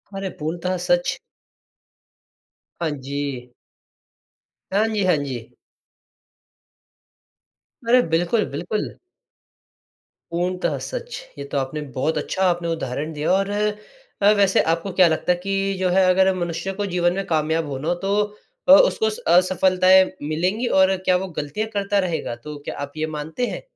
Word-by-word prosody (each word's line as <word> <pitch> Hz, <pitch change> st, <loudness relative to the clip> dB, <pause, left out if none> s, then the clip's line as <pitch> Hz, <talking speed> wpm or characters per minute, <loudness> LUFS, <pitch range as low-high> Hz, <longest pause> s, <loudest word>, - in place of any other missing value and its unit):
अरे 195 Hz, 0 st, -3 dB
पूर्णतः 175 Hz, +4 st, -2 dB
सच। 175 Hz, 0 st, +2 dB, 1.6 s
हाँ 170 Hz, -2 st, 0 dB
जी। 140 Hz, -3 st, -5 dB, 1.2 s
हाँ 210 Hz, +3 st, +3 dB
जी, 215 Hz, -3 st, -1 dB
हाँ 180 Hz, -2 st, +4 dB
जी। 130 Hz, -5 st, -6 dB, 2.3 s
अरे 250 Hz, +2 st, +6 dB
बिल्कुल, 175 Hz, +7 st, +1 dB
बिल्कुल। 175 Hz, +9 st, -3 dB, 1.4 s
पूर्णतः 180 Hz, +2 st, -1 dB
सच, -, -, -6 dB, 0.2 s
ये 140 Hz, -, -5 dB
तो -, -, -1 dB
आपने 135 Hz, +3 st, -2 dB
बहुत 155 Hz, +5 st, 0 dB
अच्छा 190 Hz, -, -3 dB
आपने 175 Hz, -1 st, -1 dB
उदाहरण 155 Hz, -2 st, -3 dB
दिया 150 Hz, +4 st, -1 dB
और 195 Hz, +1 st, +2 dB, 0.9 s
वैसे 200 Hz, -1 st, +4 dB
आपको 170 Hz, +4 st, -4 dB
क्या 180 Hz, -, +8 dB
लगता 160 Hz, +2 st, +1 dB
है 175 Hz, -, +2 dB
कि 195 Hz, 0 st, 0 dB
जो 185 Hz, -1 st, +1 dB
है 190 Hz, +2 st, +4 dB
अगर 190 Hz, +1 st, +4 dB
मनुष्य 175 Hz, +1 st, -3 dB
को 205 Hz, +1 st, -3 dB
जीवन 175 Hz, 0 st, +2 dB
में 195 Hz, +1 st, -3 dB
कामयाब 160 Hz, 0 st, 0 dB
होना 140 Hz, +2 st, -4 dB
हो 175 Hz, -, +3 dB
तो 200 Hz, -, +1 dB, 0.6 s
अ, -, -, +9 dB
उसको 475 Hz, -3 st, +5 dB
स 440 Hz, -, -6 dB
असफलताएँ 185 Hz, +1 st, +5 dB, 0.2 s
मिलेंगी 185 Hz, +10 st, 0 dB
और 190 Hz, 0 st, +5 dB
क्या 185 Hz, -, +4 dB
वो 190 Hz, +1 st, -4 dB
गलतियाँ 150 Hz, +9 st, -2 dB
करता 200 Hz, 0 st, +1 dB
रहेगा? 170 Hz, -10 st, -2 dB
तो 150 Hz, +5 st, -9 dB
क्या -, -, -5 dB
आप 145 Hz, 0 st, -5 dB
ये 155 Hz, 0 st, -1 dB
मानते 160 Hz, +11 st, -3 dB
हैं? -, -, -5 dB
180 Hz, 145 wpm, -22 LUFS, 155-195 Hz, 2.3 s, अ